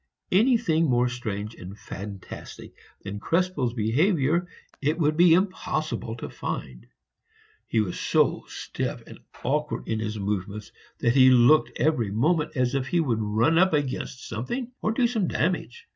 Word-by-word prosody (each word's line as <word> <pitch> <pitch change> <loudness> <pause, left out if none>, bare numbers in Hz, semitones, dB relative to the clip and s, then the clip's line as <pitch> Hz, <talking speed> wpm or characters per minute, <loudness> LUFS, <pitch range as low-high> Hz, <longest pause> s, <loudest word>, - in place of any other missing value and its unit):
Anything 205 -6 +3
more 125 0 +3
strange 110 -3 -4
and 95 +1 -10
fantastic 100 -2 -9 0.3
than 100 +1 -5
Krespel's 165 - 0
behavior 150 - +2 0.3
it 150 +3 +1
would 155 -2 +2
be 170 0 +6
impossible 155 - -2
to 115 - -6
find. - - -6 0.8
He 110 - +2
was 95 -4 -3
so - - +1
stiff - - -5
and - - -12 0.2
awkward 150 +4 -1
in 110 -1 -1
his 110 0 -3
movements, 100 +1 -4 0.3
that 120 - +3
he 130 -1 +7
looked 130 +5 +5
every 125 -5 +1
moment 150 - 0
as 125 0 +1
if 135 -1 -1
he 175 - +1
would 120 -9 0
run 110 +10 +2
up 185 -1 +4
against 135 -3 -2
something 235 - -4
or 215 - +1
do 240 +2 +2
some 225 -6 0
damage. 185 - -2
130 Hz, 150 wpm, -26 LUFS, 110-165 Hz, 0.8 s, he